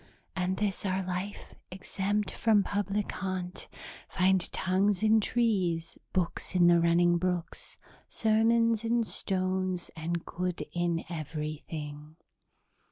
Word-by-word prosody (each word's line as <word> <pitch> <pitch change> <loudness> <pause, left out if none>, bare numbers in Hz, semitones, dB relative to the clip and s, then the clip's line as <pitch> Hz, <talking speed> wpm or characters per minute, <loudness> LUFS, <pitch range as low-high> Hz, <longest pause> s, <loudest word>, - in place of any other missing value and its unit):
'And 185 0 0
this 205 -3 -1
our 190 -1 0
life, 185 +3 -5 0.2
exempt 195 +2 -2
from 215 -3 +3
public 205 +1 -1
haunt, 185 -1 -4 0.4
finds 185 -1 +2
tongues 190 +1 +1
in 220 0 +5
trees, 190 -9 0 0.2
books 185 0 -2
in 175 -1 +5
the 175 0 +6
running 170 +1 +4
brooks, 180 -2 -3 0.3
sermons 225 +1 +3
in 230 +1 +2
stones, 185 -3 -1
and 165 +1 -3
good 180 0 -3
in 175 -1 0
everything.'" 155 -1 -6
185 Hz, 110 wpm, -30 LUFS, 170-205 Hz, 0.4 s, the